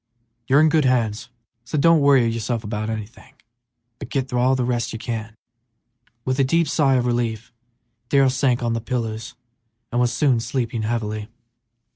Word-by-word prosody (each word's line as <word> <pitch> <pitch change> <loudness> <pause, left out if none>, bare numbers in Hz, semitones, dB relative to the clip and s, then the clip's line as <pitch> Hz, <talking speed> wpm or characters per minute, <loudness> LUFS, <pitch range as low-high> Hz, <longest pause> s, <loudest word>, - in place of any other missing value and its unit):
"You're 140 +3 +5
in 155 - +5
good 155 -2 +2
hands, 115 -3 0 0.3
so 125 +6 -4
don't 165 +2 +5
worry 140 -4 +5
yourself 115 0 -2
about 105 0 -3
anything, 110 +4 -7 0.7
but - - -8
get 130 -2 -2
all 125 +2 +3
the 125 -1 -1
rest 120 -2 -1
you - - -4
can." 115 -1 -5 0.9
With 130 +1 -1
a - - +5
deep 165 +5 +2
sigh 135 -2 +2
of 125 -1 +1
relief 120 -1 -2 0.6
Darrell 135 -2 +4
sank 130 -2 +1
on 115 -1 0
the 115 - -2
pillows, 115 -1 -4 0.6
and 120 - +1
was 120 -1 +2
soon 135 -6 +2
sleeping 115 -1 -2
heavily. 110 -1 -3
120 Hz, 165 wpm, -22 LUFS, 115-135 Hz, 0.9 s, You're